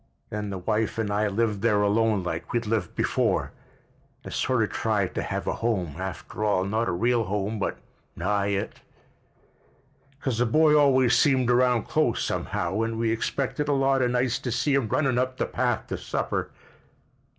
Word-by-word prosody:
Then 105 -1 -3
the 100 - -4
wife 110 +5 -1
and 110 -2 -1
I 105 +1 +1
lived 105 0 0
there 105 -2 +3
alone 105 -1 +2
like 85 -2 -4
we'd 120 -1 -1
lived 110 0 -2
before, - - 0 0.7
and - - -8
sort 130 -3 +1
of 105 - -2
tried 105 -4 0
to - - -2
have - - -3
a - - 0
home, 95 -10 -1
after 95 +3 -5
all, 100 -3 +2
not 110 +4 0
a - - 0
real 115 +6 +1
home 105 +2 -2
but - - -2 0.4
nigh 100 +3 0
it—cause 130 +5 -8
the 120 - +2
boy 155 +5 +4
always 130 -4 +4
seemed 130 -5 +3
around 125 -2 +3
close, - - 0
somehow, 95 +5 -2
and 115 0 -2
we 115 0 +1
expected 135 +5 -2
a 145 - +2
lot 135 -1 +2
of 125 - +2
nights 125 0 0
to 125 - -4
see 130 +5 +1
him 135 -5 +2
runnin' 130 +1 +1
up 130 0 -1
the - - 0
path 120 -2 -1
to - - -5
supper." - - -2
115 Hz, 180 wpm, -26 LUFS, 105-125 Hz, 0.7 s, boy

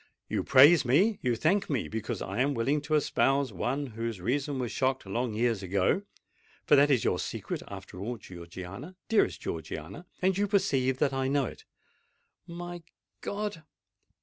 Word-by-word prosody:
You - - -1
praise 145 +5 +7
me—you 140 - +2
thank 185 - +1
me, 135 -7 -1
because 110 -1 -4
I 100 +6 -2
am 140 +1 +1
willing 135 +6 +1
to 155 +1 0
espouse 135 -3 +2
one 130 +10 -1
whose 115 -3 -4
reason 135 +8 -1
was 125 -3 -2
shocked 130 -2 0
long 115 +3 -2
years 115 -2 +1
ago;—for 100 - -1
that 145 +1 +5
is 130 -5 +3
your - - +1
secret, - - -4
after 95 -2 -9
all, 115 +5 -4
Georgiana—dearest 95 - -3
Georgiana;—and 100 - -4
you 205 - +2
perceive 140 -11 +1
that 135 0 +1
I 135 0 0
know 140 0 +2
it!" - - -9 0.8
"My 175 0 -7 0.4
God! 205 -4 -3
130 Hz, 150 wpm, -29 LUFS, 110-155 Hz, 0.8 s, praise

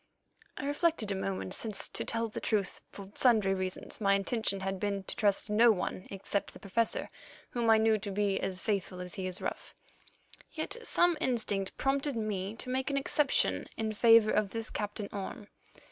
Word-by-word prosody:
I - - -4
reflected 290 - +1
a - - 0
moment, 190 -1 -3
since, 215 -2 +1
to - - -2
tell 230 0 -1
the 215 - -6
truth, 205 -3 -1
for 200 -1 -10
sundry 215 -6 +4
reasons, 185 +3 -4
my 200 -1 +4
intention 200 -1 0
had 195 0 -2
been 200 -1 -2
to - - -3
trust 205 -2 +2
no 225 +3 +6
one 185 -2 -3
except 200 +1 -2
the - - -12
Professor, 220 +3 0 0.4
whom 235 -2 0
I 220 - +7
knew 220 0 +3
to 200 - -5
be 200 0 0
as 185 -1 -2
faithful 195 -3 -1
as 180 -1 -5
he 185 -1 -3
is 185 0 -4
rough. - - -5 0.8
Yet - - -4
some 350 -7 +3
instinct 210 -7 0
prompted 275 +1 0
me 210 -2 -2
to 255 - -6
make 260 +2 -1
an 280 - 0
exception 280 +1 +2
in 220 -1 -1
favour 225 0 +6
of 210 -2 +1
this 225 +1 -3
Captain 205 0 -4
Orme. 205 +1 -6
210 Hz, 185 wpm, -31 LUFS, 195-230 Hz, 0.8 s, I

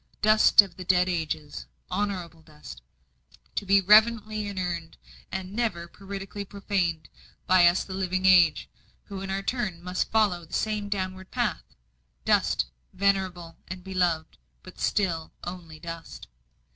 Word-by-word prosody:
Dust 215 0 +7
of 185 -4 -12
the 185 - -6
dead 180 0 +3
ages, 160 -4 -3 0.2
honourable 185 -5 -3
dust, 150 - -12 0.7
to 200 - -3
be 200 +1 +6
reverently 215 +1 +4
inurned, 175 -4 -4 0.3
and 190 0 -5
never 210 -7 -2
parricidally 195 +2 -7
profaned 195 -5 -2 0.4
by 185 -1 +6
us 175 +2 +3
the 190 - -8
living 190 0 -1
age, 175 -4 +5 0.4
who 195 -2 -8
in 195 - -6
our 195 +1 -2
turn 210 -7 -2
must 180 0 -2
follow 205 -6 +2
the 165 - -16
same 210 -2 -1
downward 190 -1 -4
path. - - -1 0.6
Dust, - - +2 0.3
venerable 185 -4 -1
and 185 0 -7
beloved 180 -4 -1 0.2
but 185 - -13
still 170 -6 -1
only 175 -3 -8
dust. 165 0 -8
185 Hz, 135 wpm, -27 LUFS, 170-200 Hz, 0.7 s, Dust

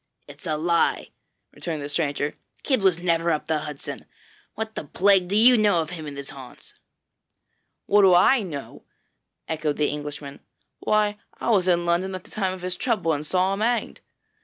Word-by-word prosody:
'It - - -13
is - - -8
a 155 -1 0
lie,' 170 +1 +1 0.4
returned 160 -3 -5
the 145 - -5
stranger; 145 -1 -1 0.3
'Kidd 260 -6 +1
was 190 -3 +3
never 170 -1 0
up 155 - 0
the 160 -1 0
Hudson! 150 -2 -7 0.5
What 220 0 -4
the - - -6
plague 190 +4 +3
do 195 - -2
you 235 +2 +6
know 205 -5 +3
of 160 +1 -3
him 160 -4 -7
and 140 -1 -7
his 140 0 -6
haunts?' 130 -2 -13 1.1
'What 205 +1 +4
do 190 -2 +6
I 245 +8 +5
know?' 155 -8 -7 0.7
echoed 155 -2 -2
the 150 - +1
Englishman. 145 -1 -6 0.4
'Why, 210 -1 +1 0.2
I - - 0
was 190 -4 +3
in 175 -1 +2
London 180 +3 0
at 185 - -7
the - - -19
time 190 -3 -1
of 185 -1 -9
his 180 0 -2
trouble 210 -10 0
and 145 0 -3
saw 185 +4 +1
him 195 - -3
hanged.' 235 +2 -1
175 Hz, 190 wpm, -24 LUFS, 150-200 Hz, 1.1 s, you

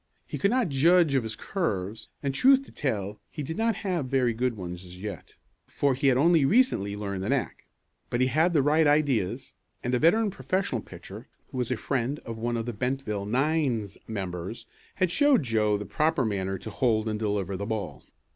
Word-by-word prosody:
He - - -6
could 200 - +3
not 245 -4 +1
judge 160 +3 +4
of 135 - +3
his 110 -1 -4
curves, 110 - -3
and, 140 -1 -1
truth 270 - +5
to - - -15
tell 105 -6 -3
he 150 - -6
did 160 +4 -4
not 225 +1 +1
have 175 -8 -1
very 125 -3 +2
good 120 0 -1
ones 90 -1 -6
as 90 0 -11
yet, 100 -4 -7 0.3
for 140 -1 +1
he 135 +2 0
had 130 -2 +4
only 165 +2 +4
recently 135 - +2
learned 100 -2 -4
the 100 - -3
knack. 135 -2 -2 0.4
But 120 - -1
he 130 - +4
had 155 +7 +2
the 145 -4 +4
right 150 +2 +4
ideas 145 -10 +1 0.3
and 125 - -1
a 125 - +3
veteran 205 - +4
professional 135 - -1
pitcher, 95 +6 -11 0.2
who 130 - -4
was 125 - -1
a 130 - 0
friend 130 +4 -1
of 115 -1 -6
one 120 +1 -1
of 115 - -3
the 120 - -3
Bentville 105 -3 -2
nine's 130 - 0
members, 95 +1 -5 0.3
had 185 -3 +1
showed 285 - +4
Joe 110 -3 +1
the 105 - -6
proper 155 - +1
manner 95 -2 -1
to - - -8
hold 115 -4 +1
and 110 -1 -2
deliver 100 -3 -1
the 100 +2 -4
ball. 100 - -4
125 Hz, 205 wpm, -27 LUFS, 105-150 Hz, 0.4 s, truth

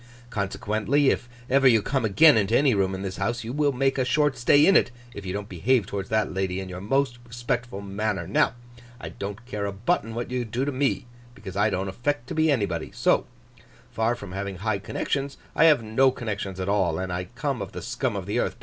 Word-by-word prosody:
Consequently, 110 +7 +1
if 120 - -3 0.2
ever 135 +1 +4
you 115 -3 +6
come 135 -2 0
again 145 +9 +6
into 110 +1 +3
any 140 -3 +4
room 95 -2 +1
in 95 - -5
this 95 -1 -4
house, 120 0 -1
you 115 +2 -5
will 145 0 +2
make 135 +1 0
a - - +3
short 145 +2 +2
stay 145 +4 +5
in 195 - +5
it - - +5 0.2
if 100 -2 -8
you - - -2
don't 100 +1 -4
behave 105 +5 +1
towards 100 0 -5
that 110 -2 0
lady 95 -1 -1
in 95 - -5
your 90 0 -7
most 130 +3 0
respectful 120 -3 -3
manner. 100 +1 -2
Now, - - +2 0.4
I - - -6
don't 100 +3 -7
care 105 -5 -3
a - - -2
button 115 - -1
what 120 +1 -4
you 125 -1 -1
do 120 +4 -2
to 145 - -1
me, 135 -1 0 0.3
because 95 -8 -9
I 105 +2 +3
don't 95 -1 -2
affect 120 +6 -2
to - - -3
be 160 0 +2
anybody. 115 -9 0
So - - +2 0.6
far 115 +2 +1
from 100 -6 -9
having 95 +1 -4
high 100 +2 -1
connections 140 +6 -3 0.2
I 165 - +5
have 150 -7 +5
no 115 +5 +3
connections 100 -6 -4
at 95 - -3
all, 95 -5 +1
and 95 -1 -3
I 90 +1 -3
come - - -2
of - - -5
the - - -7
scum - - -2
of - - -4
the - - -1
earth. - - -1
110 Hz, 230 wpm, -25 LUFS, 100-130 Hz, 0.6 s, you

